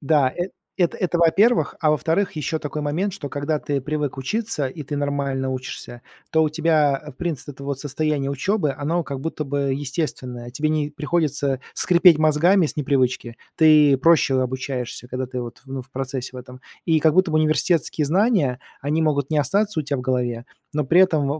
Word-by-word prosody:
Да, 140 -2 +3
э, 175 +5 -4 0.3
это 175 -3 +1
это 175 -2 -1
во-первых, 200 +8 +3
а 155 -2 +3
во-вторых, 165 +6 +1
еще 155 +1 -2
такой 150 0 -4
момент, 175 +7 -1
что, 155 -7 -6
когда 145 +2 -2
ты 140 -1 -2
привык 150 0 -3
учиться, 150 - -2
и 150 +2 -8
ты 145 +1 -4
нормально 140 -2 -1
учишься, 130 -1 -7 0.3
то 160 0 +3
у - - +2
тебя, 155 -3 +2
э, 150 - -8
в - - -29
принципе, 165 -6 -4
это 140 +1 -11
вот 140 -1 -3
состояние 145 -1 -1
учебы- 150 +2 0
оно 165 +4 0
как 140 -2 -5
будто 160 0 -3
бы 140 -1 -1
естественное. 135 -4 -4
Тебе 150 +5 -1
не 150 -1 0
приходится 150 -4 -1
скрипеть 175 -2 +5
мозгами 160 +4 +4
с - - -6
непривычки. 130 -4 0 0.2
Ты 150 -3 +6
проще 140 -4 +4
обучаешься, 130 -1 -4
когда 130 +1 -3
ты 125 0 -5
вот, 120 0 -8
ну, 135 -1 -5
в 130 - -22
процессе 130 -1 -4
в - - -10
этом. 125 +1 -10 0.3
И 160 -2 +3
как 155 0 +4
будто 185 -3 +3
бы 155 - +3
университетские 155 0 +1
знания, 175 - +2 0.2
они 150 +3 0
могут 145 -2 0
не 155 - +2
остаться 200 +5 +1
у - - -3
тя 140 0 -2
в - - -3
голове, 125 -2 -2 0.3
но 150 -1 0
при 170 +7 +4
этом 160 -7 +3
145 Hz, 195 wpm, -22 LUFS, 135-160 Hz, 0.3 s, Ты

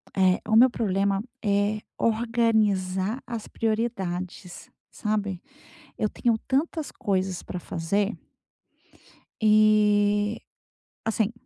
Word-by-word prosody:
É. 185 -1 +3
O 220 - +2
meu 250 +3 +8
problema 200 -4 0 0.2
é 205 0 +1 0.2
organizar 220 -2 +1
as 235 -3 -6
prioridades, 190 -6 -3 0.2
sabe? 205 -4 -2 0.6
Eu 215 -3 0
tenho 235 -2 +1
tantas 300 +2 -1
coisas 190 -2 -1
pra 180 - -6
fazer 200 +7 -1 1.3
e 210 -1 +4 0.6
assim. 220 0 0
210 Hz, 90 wpm, -26 LUFS, 195-225 Hz, 1.3 s, meu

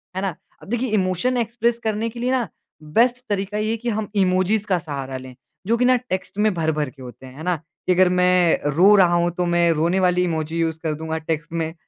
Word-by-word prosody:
है 190 - -2
ना? 190 -4 -2 0.3
अब - - -14
देखिए 240 +2 -1
इमोशन 185 +8 0
एक्सप्रेस 235 0 0
करने 220 +1 -1
के 235 +1 -10
लिए 250 +2 0
ना 250 -4 0 0.4
बेस्ट 235 +11 +2
तरीका 205 0 -2
ये 215 +1 -1
है 230 - -1
कि 240 +2 -3
हम 215 -1 -2
इमोजीज़ 190 +2 +2
का 185 - +2
सहारा 140 -5 -5
लें। 130 -1 -11 0.3
जो 230 +2 +2
कि 250 - +2
ना 255 0 +5
टेक्स्ट 205 -5 -5
में 210 -1 +2
भर-भर 155 -4 -1
के 135 +1 -17
होते 125 +1 -11
हैं। 130 0 -12
है 155 - -8
ना? 180 0 +1 0.3
कि 185 - +4
अगर 185 0 +4
मैं 180 -1 +3 0.2
रो 195 +5 +6
रहा 180 -3 +5
हूँ 175 0 +2
तो 180 +1 -2
मैं 175 0 +2
रोने 170 +4 +1
वाली 180 -1 +2
इमोजी 160 -2 -2
यूज़ 160 -1 -1
कर 160 -2 -1
दूँगा 160 +1 -4
टेक्स्ट 160 0 -4
में। 160 -1 -2
180 Hz, 235 wpm, -22 LUFS, 160-215 Hz, 0.4 s, रो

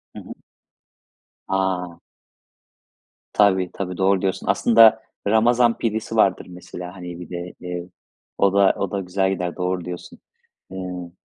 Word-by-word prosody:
Hı - - -6
hı. - - -9 1.2
A! 90 -3 -1 1.3
Tabii, 95 -3 +3
tabii. 90 -2 -5
Doğru 95 0 +2
diyorsun. 95 -1 -2
Aslında 115 -1 +5 0.3
ramazan 115 +2 +3
pidesi 110 0 -2
vardır 100 -4 +3
mesela, 90 0 -9
hani, 90 -2 -8
bir 90 - -9
de, 90 0 -6
eee, 90 0 -6 0.5
o 100 -1 +3
da 100 -1 +5
o 100 - -2
da 100 - -1
güzel 95 +1 0
gider, 90 -2 -3
doğru 90 -1 -2
diyorsun. 90 0 -8 0.5
Iıı, 90 -2 -6
95 Hz, 135 wpm, -22 LUFS, 90-100 Hz, 1.3 s, Aslında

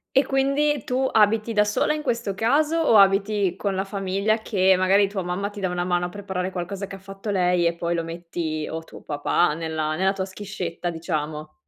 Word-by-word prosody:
E 270 - +5
quindi 275 0 +1
tu 260 +1 0
abiti 220 +1 +3
da 210 - +4
sola, 210 +8 +1
in 305 - -3
questo 235 -7 -1
caso 290 +10 +2
o 310 -9 +4
abiti 195 -1 +3
con 200 -1 -2
la 190 +1 -1
famiglia, 200 +2 0
che 190 -4 +3
magari 195 +2 +4
tua 195 -1 -4
mamma 180 +3 -2
ti 205 -1 -9
dà 185 - 0
una 175 0 -2
mano 175 0 0
a - - -9
preparare 190 -1 -4
qualcosa 190 +2 -4
che 195 - -9
ha - - -16
fatto 195 +2 -8
lei 180 -3 +2
e 170 - +1
poi 170 0 -1
lo 165 - -1
metti 165 -2 -4
o 160 0 -5
tuo - - -13
papà, 150 +2 +1
nella 160 -1 -2
nella 190 +3 +2
tua 190 -1 -3
schiscetta, 190 -3 -5
diciamo? 155 -2 -4
195 Hz, 210 wpm, -24 LUFS, 175-210 Hz, -, E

